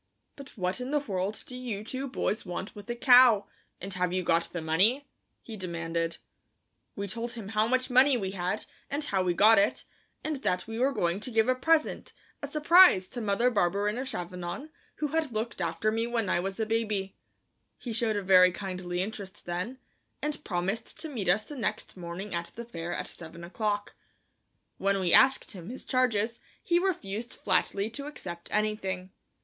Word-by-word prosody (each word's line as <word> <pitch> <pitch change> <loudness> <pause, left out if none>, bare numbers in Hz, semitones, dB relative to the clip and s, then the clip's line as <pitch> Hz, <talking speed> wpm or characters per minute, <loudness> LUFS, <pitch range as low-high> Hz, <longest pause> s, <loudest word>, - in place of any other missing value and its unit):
"But 280 -4 -12
what 185 +5 -1
in 250 - -4
the 295 - +2
world 200 -6 -2
do 250 - -6
you 235 -5 -4
two 260 +5 -4
boys 225 -3 -1
want 180 +3 -5
with 205 +1 -11
a 240 - -1
cow, 245 -4 +7 0.3
and 195 +1 -6
have 180 -1 0
you 185 0 0
got 170 0 +1
the 175 - -3
money?" 195 - +2 0.4
he 225 - -8
demanded. 170 -3 -3 0.8
We 200 0 -3
told 230 +4 -4
him 220 -4 -7
how 215 0 +2
much 255 +1 +1
money 260 +1 +6
we 190 -4 -3
had, 185 +2 -2 0.2
and 290 +2 -2
how 195 -9 +1
we 180 -1 +1
got 220 +3 +7
it, 200 +2 +1 0.4
and 310 -1 -2
that 180 -9 -1
we 225 +1 -5
were 265 +3 +3
going 175 -7 0
to 235 - -5
give 225 -1 +2
a 255 - +4
present, 310 +5 +1 0.3
a - - -3
surprise, 305 - +6
to 245 - -6
Mother 220 +4 +2
Barberin 205 +2 +1
of 260 - -3
Chavanon, 180 - -5 0.2
who 300 - -2
had 315 -2 0
looked 220 -2 -3
after 170 +6 0
me 225 +1 0
when 230 -4 -1
I - - +2
was 195 +3 -4
a 220 - +1
baby. 215 -3 -1 0.6
He 240 - -5
showed 220 -1 +1
a 205 - -1
very 185 -1 +7
kindly 185 -1 -3
interest 205 -1 -7
then, 180 +9 -3 0.4
and 300 0 -3
promised 195 +5 -3
to 320 - -5
meet 215 -10 -2
us 210 +4 +3
the 295 - -9
next 215 -4 -3
morning 180 +3 -6
at 170 0 -3
the 235 - -6
fair 170 -6 -6
at - - -3
seven 170 0 -10
o'clock. 205 +3 -2 0.9
When 195 0 +2
we 180 -2 +1
asked 265 0 +5
him 180 -2 -8
his 255 - -7
charges 235 -3 +1 0.2
he 345 0 +3
refused 235 - -2
flatly 200 +2 0
to 280 +4 -6
accept 175 - -7
anything. 195 -3 -1
210 Hz, 190 wpm, -29 LUFS, 185-245 Hz, 0.9 s, cow